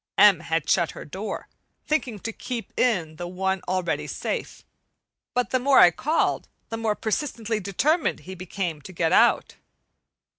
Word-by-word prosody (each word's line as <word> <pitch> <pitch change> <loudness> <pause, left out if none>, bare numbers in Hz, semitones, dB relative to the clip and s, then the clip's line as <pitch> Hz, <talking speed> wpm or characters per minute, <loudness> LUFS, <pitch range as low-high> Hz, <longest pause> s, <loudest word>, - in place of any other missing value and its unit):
M. 200 -4 +7
had 160 -1 -2
shut 170 - +2
her - - -7
door, 195 +7 -5 0.4
thinking 270 -8 0
to 225 - -4
keep 240 -1 -6
in 170 -11 +1
the 175 +1 -5
one 190 +1 -1
already 185 -2 -1
safe. - - -4 0.7
But 250 0 0
the 255 - +2
more 270 +2 +4
I 175 - +9
called, 305 - 0 0.2
the 225 - -3
more 220 -2 0
persistently 225 -1 -2
determined 270 - +1
he 190 - -8
became 180 -3 -4
to 185 - -11
get 165 -1 +1
out. - - +4
200 Hz, 155 wpm, -25 LUFS, 175-235 Hz, 0.7 s, I